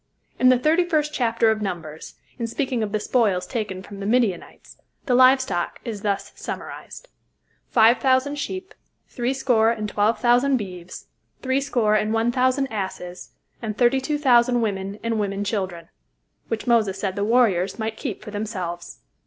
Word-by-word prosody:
In 255 - +6
the 255 - +5
Thirty 310 +7 +3
First 305 -3 0
Chapter 230 -3 +2
of 215 -1 -2
Numbers, 165 -6 -6 0.2
in 230 - -2
speaking 255 0 -2
of 210 -2 -2
the 215 - 0
spoils 210 -5 +1
taken 200 -6 -4
from 200 -1 -10
the 200 - -4
Midianites, 225 -5 -1 0.3
the 255 - +1
live 255 +2 +7
stock 175 -9 -3
is 220 -4 -5
thus 200 -2 -2
summarized: - - -8 0.6
"Five 230 +1 +5
thousand 265 +2 +2
sheep, 375 +5 -5 0.4
threescore 245 -2 +1
and 215 -2 -2
twelve 210 +2 +1
thousand 245 +3 +3
beeves, 185 -4 -8 0.4
threescore 260 -5 +1
and 215 +1 +1
one 225 +1 +2
thousand 255 +2 +2
asses, 185 -3 -5 0.3
and 215 -3 -4
thirty 255 +2 +3
two 295 +3 -1
thousand 245 -3 +4
women 200 -2 -3
and 230 -1 -1
women 200 -1 -2
children," 190 -5 -3 0.6
which 225 - -3
Moses 225 -6 +2
said 190 -2 -2
the 200 - -1
warriors 205 -5 +2
might 220 -1 -3
keep 235 -4 -5
for 210 - -8
themselves. 185 -5 -5
225 Hz, 160 wpm, -23 LUFS, 200-255 Hz, 0.6 s, live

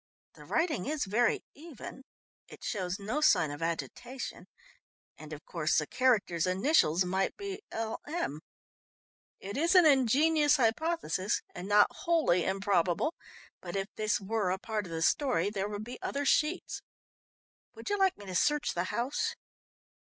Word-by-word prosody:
"The - - -14
writing 320 - 0
is 305 0 -1
very 225 +5 +1
even 285 -3 -10 0.4
it - - -13
shows 185 -3 -2
no 220 +9 -3
sign 180 - +4
of 145 - -7
agitation, 240 +10 -5 0.7
and 155 0 -12
of 155 0 -8
course 165 -3 0
the 150 - +2
character's 200 - +1
initials 185 - +3
might 190 +2 -1
be 400 0 -6
'L.M.' 225 - -4 1.0
It 200 +4 -6
is 335 +5 +2
an 360 -2 +8
ingenious 295 +3 +4
hypothesis, 250 - 0
and 180 +2 -7
not 205 0 +6
wholly 320 - +1
improbable, 195 - +1 0.5
but 175 0 -7
if 195 +1 -2
this 215 -1 0
were 205 -1 -1
a 185 - 0
part 210 -1 -3
of - - -10
the 165 0 -2
story, 255 - +2
there 200 -1 -2
would 205 0 -5
be 245 +3 -9
other 285 +1 -2
sheets. 310 +6 +1 0.9
Would - - -6
you 410 - +2
like 385 -1 +3
me 205 - -11
to 190 - -7
search 295 +11 +1
the 175 +1 -1
house?" 235 +8 -2
215 Hz, 150 wpm, -30 LUFS, 185-295 Hz, 1.0 s, an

